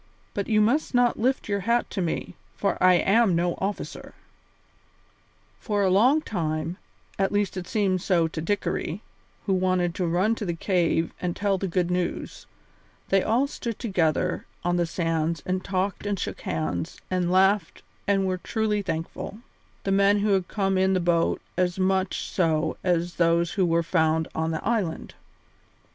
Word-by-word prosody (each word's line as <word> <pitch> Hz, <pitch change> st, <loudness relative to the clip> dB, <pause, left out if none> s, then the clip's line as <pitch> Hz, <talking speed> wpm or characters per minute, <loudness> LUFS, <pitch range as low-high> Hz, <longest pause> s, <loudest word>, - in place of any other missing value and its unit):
But 200 Hz, -, -2 dB
you 215 Hz, -1 st, +3 dB
must 250 Hz, +6 st, +1 dB
not 245 Hz, -1 st, +3 dB
lift 260 Hz, +4 st, 0 dB
your 200 Hz, -1 st, 0 dB
hat 235 Hz, +5 st, 0 dB
to 195 Hz, -, -2 dB
me, 170 Hz, -, -2 dB, 0.2 s
for 200 Hz, -, 0 dB
I 185 Hz, 0 st, +7 dB
am 195 Hz, +2 st, +3 dB
no 175 Hz, +1 st, +1 dB
officer." 200 Hz, +1 st, -5 dB, 1.4 s
For 205 Hz, -3 st, 0 dB
a 190 Hz, -, +3 dB
long 250 Hz, +11 st, +5 dB
time, 160 Hz, -, -3 dB, 0.4 s
at 195 Hz, -, +2 dB
least 205 Hz, -2 st, 0 dB
it 180 Hz, -1 st, -5 dB
seemed 195 Hz, -4 st, +1 dB
so 170 Hz, -3 st, +2 dB
to 160 Hz, 0 st, -5 dB
Dickory, 205 Hz, +1 st, -2 dB, 0.4 s
who 195 Hz, -, +1 dB
wanted 185 Hz, -2 st, +1 dB
to 180 Hz, 0 st, -1 dB
run 185 Hz, +7 st, +2 dB
to 225 Hz, -, -5 dB
the 170 Hz, -2 st, -2 dB
cave 170 Hz, -2 st, +1 dB
and 175 Hz, -1 st, -2 dB
tell 200 Hz, -2 st, 0 dB
the 195 Hz, -, -2 dB
good 180 Hz, 0 st, 0 dB
news, 180 Hz, -1 st, -3 dB, 0.6 s
they 195 Hz, 0 st, +4 dB
all 235 Hz, +8 st, +2 dB
stood 235 Hz, -5 st, -5 dB
together 180 Hz, -5 st, 0 dB, 0.2 s
on 175 Hz, 0 st, +1 dB
the 175 Hz, -1 st, +1 dB
sands 165 Hz, -2 st, -1 dB
and 185 Hz, 0 st, -1 dB
talked 195 Hz, +1 st, -2 dB
and 205 Hz, -1 st, 0 dB
shook -, -, -4 dB
hands 80 Hz, +1 st, -3 dB
and 180 Hz, -1 st, +1 dB
laughed 190 Hz, -1 st, +2 dB, 0.2 s
and 195 Hz, -1 st, +2 dB
were 185 Hz, -1 st, -1 dB
truly 215 Hz, 0 st, -1 dB
thankful, 170 Hz, +2 st, -4 dB, 0.5 s
the 195 Hz, -, -1 dB
men 200 Hz, +1 st, +4 dB
who 210 Hz, -, +1 dB
had 190 Hz, -3 st, +2 dB
come 195 Hz, -2 st, 0 dB
in 190 Hz, 0 st, +3 dB
the 185 Hz, -, +2 dB
boat 170 Hz, -1 st, +1 dB, 0.2 s
as 180 Hz, 0 st, +1 dB
much 190 Hz, 0 st, 0 dB
so 160 Hz, -3 st, +1 dB
as 175 Hz, -1 st, 0 dB
those 170 Hz, 0 st, +2 dB
who 190 Hz, -4 st, +1 dB
were 170 Hz, 0 st, +2 dB
found 160 Hz, -1 st, +1 dB
on 160 Hz, 0 st, -1 dB
the 160 Hz, -1 st, -3 dB
island. 205 Hz, -9 st, -1 dB
185 Hz, 170 wpm, -25 LUFS, 170-200 Hz, 1.4 s, I